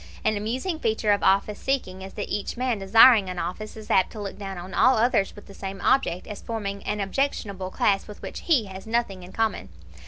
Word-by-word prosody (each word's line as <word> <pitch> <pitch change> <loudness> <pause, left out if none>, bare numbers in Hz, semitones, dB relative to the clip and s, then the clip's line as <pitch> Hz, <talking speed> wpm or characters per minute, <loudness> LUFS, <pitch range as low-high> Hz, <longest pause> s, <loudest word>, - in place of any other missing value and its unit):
An 215 - +3
amusing 255 - -2
feature 220 -3 +1
of 205 - +2
office 200 +2 +2
seeking 220 -9 -2
is 190 0 -8
that 205 - -4
each 205 - -3
man 250 -3 0
desiring 210 +1 +6
an 180 - -5
office 215 +5 -5
is 215 - -7
apt 190 - +3
to 220 - -8
look 200 -2 -5
down 195 -2 -6
on 180 +2 -8
all 260 -1 +5
others 220 -4 +2
with 205 - -12
the 200 - -13
same 195 0 -6
object 260 -9 +2
as 210 -2 -8
forming 200 -3 -4
an 210 - -2
objectionable 200 -3 -2
class 195 +1 +1
with 210 - -10
which - - -6
he 280 -10 +3
has 190 +1 -9
nothing 220 -5 -1
in 180 +1 -11
common. 220 - -1
205 Hz, 220 wpm, -25 LUFS, 195-225 Hz, -, desiring